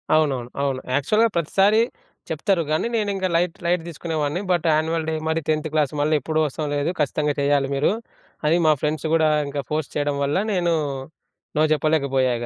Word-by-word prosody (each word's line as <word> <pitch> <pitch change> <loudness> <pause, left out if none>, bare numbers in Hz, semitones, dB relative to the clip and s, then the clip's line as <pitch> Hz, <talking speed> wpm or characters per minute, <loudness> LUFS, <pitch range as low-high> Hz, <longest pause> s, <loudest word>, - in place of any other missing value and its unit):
అవునవును. 135 -6 +1
అవును. 135 -2 0 0.2
యాక్చువల్‌గా 215 +11 +3
ప్రతిసారీ 195 +6 +3 0.5
చెప్తరు, 195 -5 +1
కానీ 155 +8 +1
నేనింకా 200 -4 0
లైట్, 170 0 +1
లైట్ 175 0 +2
తీసుకునే 165 0 -5
వాణ్ణి. 150 +5 -1
బట్ 175 -2 +1
యాన్యువల్ 160 +1 0
డే - - -1
మరి 160 +1 0
10 155 0 +1
క్లాస్ 150 -3 +1
మళ్ళీ 155 +2 +2
ఎప్పుడూ 155 +4 -1
వస్తాం 150 +2 -3
లేదు 145 +2 0
ఖచ్చితంగా 150 0 +1
చేయాలి 140 -1 +2
మీరు, 140 +5 +2 0.5
అని 160 +3 +4
మా 155 - +6
ఫ్రెండ్స్ 150 0 -1
కూడా 160 -1 +4 0.2
ఇంకా 140 0 -3
ఫోర్స్ 155 -2 -2
చేయడం 145 -1 0
వల్ల 140 +4 +1 0.2
నేను 175 -2 +1 0.8
నో - - +4
చెప్పలేకపోయా 140 -4 +1
ఇగ. 120 - -4
155 Hz, 175 wpm, -23 LUFS, 145-170 Hz, 0.8 s, మా